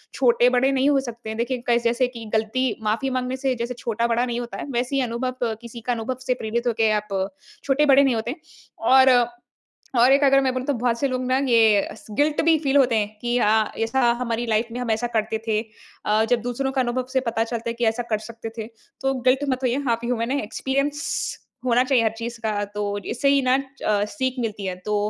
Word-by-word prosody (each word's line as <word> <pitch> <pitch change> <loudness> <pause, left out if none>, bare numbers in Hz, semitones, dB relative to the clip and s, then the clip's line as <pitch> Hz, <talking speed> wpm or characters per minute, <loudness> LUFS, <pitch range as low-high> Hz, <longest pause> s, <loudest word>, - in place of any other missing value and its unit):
छोटे-बड़े 250 +1 +3
नहीं 270 +1 +2
हो 285 -1 +3
सकते। 235 -3 -7
देखिए 240 +2 -2
कस 235 0 +3
जैसे 240 +2 +2
कि 235 -2 -9
गलती 220 +4 0 0.2
माफ़ी 220 +5 0
माँगने 255 0 -2
से 265 0 0
जैसे 235 +1 -3
छोटा-बड़ा 235 +1 0
नहीं 240 -1 -3
होता 235 -1 -7
है, - - -5
वैसे 245 +2 -1
ही 275 - +2
अनुभव 250 +2 -3 0.3
किसी 235 0 -9
का 245 +2 -1
अनुभव 235 +2 -3
से 255 - +3
प्रेरित 235 +1 -3
होके 225 -2 +2
आप 200 -2 -1 0.4
छोटे-बड़े 280 0 +5
नहीं 265 -3 +2
होते 225 +2 -2
हैं। 315 - -8 0.5
और, 265 0 +7 0.9
और 245 +3 +6
एक 280 +1 +3
अगर 275 0 +5
मैं 260 -1 +1
बोलूँ 255 0 -4
तो 285 - +2
बहुत 235 -1 0
से 280 - +1
लोग 255 -1 -2
ना 255 +1 +2
ये 225 -4 +5
अस 220 - -11
गिल्ट 290 +7 +1
भी 325 -1 +5
फ़ील 285 -2 +1
होते 255 -4 +4
हैं 205 -1 0
कि 240 0 0
अ, 215 -1 +2
ऐसा 240 +2 +2
हमारी 235 -1 -1
लाइफ़ 225 +1 0
में 245 - -4
हम 240 -2 -1
ऐसा 220 +2 0
करते 220 +1 -1
थे। 215 -1 +1 0.4
अ, 215 +1 +3
जब 245 -1 +2
दूसरों 245 +3 -2
का 265 - +2
अनुभव 250 +1 -1
से 260 - +3
पता 225 0 0
चलता 235 0 -4
है - - -2
कि 235 0 -1
ऐसा 225 +2 0
कर 215 - +3
सकते 230 0 -7
थे, 220 -1 -4 0.3
तो 270 0 +1 0.2
गिल्ट 265 +3 +2
मत 260 -1 0
होइए। 255 +3 0
आप 230 - +1
ह्यूमन 235 0 -1
हैं, 280 -2 0
एक्सपीरियंस 275 +6 -2 0.3
होना 245 0 +4
चाहिए 255 -3 +2
हर 220 - +2
चीज़ 230 0 -5
का। 210 -1 0
तो 205 -1 -2
इससे 265 +4 0
ही 280 0 +4
ना 255 0 +3 0.2
च 205 -1 +1
सीख 260 -2 -2
मिलती 210 -4 -3
है। 185 -1 -2
तो 210 - 0
240 Hz, 225 wpm, -23 LUFS, 225-260 Hz, 0.9 s, और